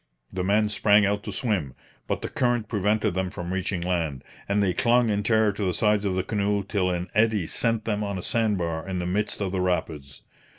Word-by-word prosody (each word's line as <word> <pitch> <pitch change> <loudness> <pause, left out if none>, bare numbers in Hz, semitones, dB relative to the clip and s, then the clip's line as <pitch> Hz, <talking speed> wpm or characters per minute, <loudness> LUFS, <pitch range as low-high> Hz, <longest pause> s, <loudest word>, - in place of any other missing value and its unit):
The 95 -1 -2
men 105 +3 +2
sprang 105 0 +4
out 100 +1 0
to - - -4
swim, 95 - -2 0.3
but - - -2
the - - -1
current 120 -3 0
prevented 105 0 +1
them 95 0 -1
from 90 -2 -5
reaching 95 -1 -2
land, 85 -6 -2 0.3
and 100 +1 +2
they 95 -2 +1
clung 120 +2 +3
in 100 0 0
terror 110 0 +3
to 105 +1 -4
the 90 -2 0
sides 105 -1 +2
of 95 -2 0
the 95 - 0
canoe 100 0 0
till 95 -2 0
an 90 0 -3
eddy 110 -3 +2
sent 115 +5 -1
them 105 -1 -1
on 100 -2 -3
a 90 - -6
sand 110 -3 +1
bar 85 -1 -3
in 95 - -2
the 90 - -2
midst 105 +4 -1
of 95 -2 -1
the 95 -1 -1
rapids. 80 -6 -3
100 Hz, 225 wpm, -25 LUFS, 90-105 Hz, 0.3 s, sprang